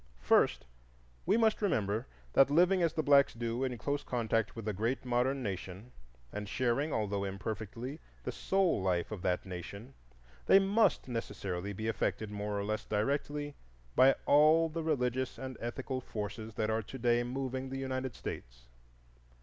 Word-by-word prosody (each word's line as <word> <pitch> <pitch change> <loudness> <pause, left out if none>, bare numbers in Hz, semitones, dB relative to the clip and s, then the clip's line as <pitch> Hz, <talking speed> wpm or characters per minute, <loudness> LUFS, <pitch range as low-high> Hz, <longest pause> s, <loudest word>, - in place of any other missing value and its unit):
First, - - +3 0.6
we 200 +4 +4
must 220 -2 +3
remember 110 - 0 0.3
that 135 0 +6
living 180 +5 +4
as 165 -2 +2
the 155 - 0
blacks 140 -3 +5
do 115 +2 -2
in 125 -2 -2
close 145 +4 -2
contact 115 -3 0
with 115 -2 -6
a 105 - 0
great 115 +7 -1
modern 125 +2 +1
nation, 95 +2 -5 0.4
and 105 -1 -5
sharing, 130 +5 0
although 100 -4 -1
imperfectly, 110 - -5 0.2
the - - -3
soul 190 - +1
life 90 -1 0
of 105 -4 -5
that 90 0 0
nation, 100 +7 -8 0.5
they - - +8
must 200 -1 +3
necessarily 100 -5 -4
be 110 +3 -4
affected 110 -1 -1
more 105 0 -3
or - - -2
less 110 +1 -2
directly 145 +7 -1 0.4
by 135 +1 +6
all 155 +3 +5
the 165 +1 -3
religious 130 -5 0
and 130 -1 -6
ethical 130 +2 -4
forces 110 -1 -6
that 110 0 0
are 110 +1 +1
to 115 +5 -9
day 120 -1 +3
moving 130 +1 -3
the 135 - -4
United 130 -2 -3
States. - - -7
120 Hz, 160 wpm, -32 LUFS, 105-140 Hz, 0.6 s, they